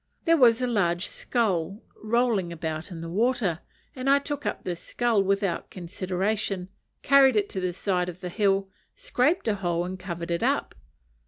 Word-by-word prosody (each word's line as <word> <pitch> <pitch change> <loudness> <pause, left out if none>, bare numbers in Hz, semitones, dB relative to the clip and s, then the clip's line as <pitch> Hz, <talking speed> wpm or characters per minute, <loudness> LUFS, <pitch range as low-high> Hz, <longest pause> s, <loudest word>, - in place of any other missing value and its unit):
There 330 -1 +5
was 245 -4 +5
a - - +1
large 180 -6 +1
skull 195 -5 -1 0.2
rolling 220 -5 0
about 160 0 -4
in 170 -3 -7
the 165 - -5
water, 205 -2 0 0.4
and 260 +1 -2
I 280 - +6
took 290 0 -3
up - - -3
this 175 -2 -4
skull 235 -4 +1
without 195 -1 0
consideration, 185 +2 -2 0.3
carried 275 -3 +6
it 205 -1 +1
to 190 - -4
the 185 -1 -1
side 180 0 -1
of 180 0 -9
the 180 - -4
hill, 195 0 +1 0.3
scraped 345 - +1
a 220 - +3
hole, 175 -3 -1
and 185 +1 -6
covered 175 -2 -5
it 170 - 0
up. - - 0
195 Hz, 175 wpm, -26 LUFS, 175-240 Hz, 0.4 s, I